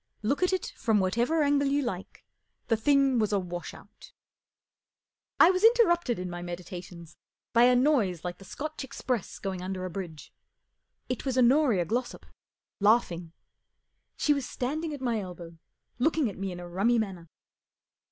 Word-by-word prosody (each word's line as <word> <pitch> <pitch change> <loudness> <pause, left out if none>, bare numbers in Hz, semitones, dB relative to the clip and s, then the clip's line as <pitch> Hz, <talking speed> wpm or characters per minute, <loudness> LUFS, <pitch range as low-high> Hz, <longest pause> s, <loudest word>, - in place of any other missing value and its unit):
Look 275 +10 0
at 365 - +3
it 375 -2 -2
from 220 -3 +1
whatever 235 +12 +1
angle 285 -1 +2
you 285 +1 +1
like, 195 -7 -6 0.4
the 225 - +4
thing 275 +2 +3
was 215 -1 +1
a 205 - +2
wash 175 -2 -5
out* - - -16 1.3
I 340 - +8
was 370 +1 -1
interrupted 345 - +4
in 180 0 -4
my 175 0 -6
medi¬ 175 0 -6
tations 175 -2 -10 0.4
by 235 +1 +6
a 250 0 +5
noise 240 - +2
like 175 0 -5
the - - -12
Scotch 305 +9 -6
express 250 -4 -3
going 190 -2 -4
under 185 0 -4
a 185 - -5
bridge. 170 -4 -7 0.7
It 250 - -3
was 265 -2 -2
Honoria 250 - +4
Glossop 240 +6 -3 0.5
laughing. 180 -6 +2 0.8
She 295 - +3
was 280 -3 -3
standing 305 +6 -3
at 290 -3 -6
my 235 -4 0
elbow, 175 -3 -9 0.4
looking 300 -3 +2
at - - -13
me 195 -1 -3
in 175 - -7
a 175 - -8
rummy 200 +7 +2
manner. 190 -7 -3
225 Hz, 165 wpm, -28 LUFS, 180-275 Hz, 1.3 s, I